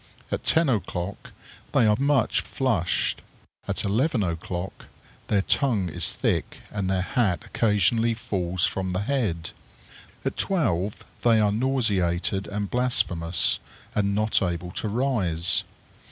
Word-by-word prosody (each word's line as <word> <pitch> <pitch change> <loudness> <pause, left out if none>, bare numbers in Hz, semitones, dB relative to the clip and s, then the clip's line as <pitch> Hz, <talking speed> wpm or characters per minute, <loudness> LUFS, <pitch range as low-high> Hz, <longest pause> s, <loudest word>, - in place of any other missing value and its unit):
At - - -2
ten 165 0 +3
o'clock 100 -5 -2 0.4
they 115 - +4
are 105 -1 +4
much 140 0 +2
flushed. 115 -11 0 0.5
At - - -1
eleven 115 +3 +1
o'clock 85 +1 -4 0.4
their 100 -2 +2
tongue 110 -10 +1
is 85 0 +2
thick, - - -1
and 100 -3 -2
their 95 -1 +1
hat 105 -5 0
occasionally 115 +2 +2
falls 90 -5 0
from 95 -1 -2
the 90 - -1
head. 100 -10 -1 0.7
At - - -2
twelve 105 - 0 0.2
they 115 -2 +4
are 105 -1 +3
nauseated 100 -7 +1
and 100 -1 -3
blasphemous, 90 -9 +2 0.3
and 100 -1 +1
not 110 +1 +2
able 90 -1 -2
to 110 - -3
rise. 100 -8 +1
100 Hz, 125 wpm, -25 LUFS, 90-115 Hz, 0.7 s, they